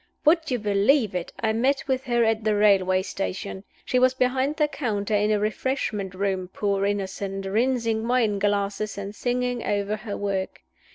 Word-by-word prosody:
Would 325 +2 +4
you 250 - +1
believe 210 +2 +2
it, 180 -2 -3
I 220 -1 +1
met 265 +5 +1
with 265 0 -1
her 240 -2 +2
at 225 -1 +1
the 215 -1 +2
railway 190 -3 +4
station. 195 0 -4 0.2
She 255 - +2
was 255 +1 +4
behind 260 +3 +1
the 305 -1 +2
counter 220 -8 -2
in 210 0 +2
a 215 - +3
refreshment 210 -3 -2
room, 190 -1 -1
poor 200 +1 -1
innocent, 195 -1 -3
rinsing 230 +1 0
wine 230 -5 +2
glasses, 205 +1 -1
and 200 0 -5
singing 245 +1 -1
over 205 +1 -1
her 215 -1 -6
work. 195 -2 -3
215 Hz, 170 wpm, -25 LUFS, 200-250 Hz, 0.2 s, Would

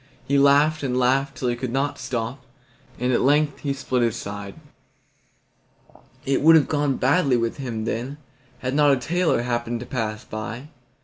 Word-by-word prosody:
He 140 0 +2
laughed 145 +3 +4
and 130 -3 -1
laughed 135 +2 +1
till 125 - -2
he 120 - 0
could 125 +1 -4
not 135 +3 -1
stop, 120 +2 -4 0.5
and 125 +1 0
at - - +2
length 145 +2 +2
he 140 - -2
split 130 -2 -1
his 115 -1 +1
side. 100 -3 -7 1.7
It 135 0 +1
would 160 +2 +7
have 155 - +4
gone 145 -3 0
badly 135 -1 +2
with 115 +2 -2
him 115 -5 -4
then, 125 +6 -3 0.4
had 130 0 -3
not 145 0 +4
a - - +2
tailor 165 -2 0
happened 120 -1 -2
to - - -6
pass 110 -4 -4
by. 115 +6 -6
130 Hz, 175 wpm, -23 LUFS, 120-140 Hz, 1.7 s, would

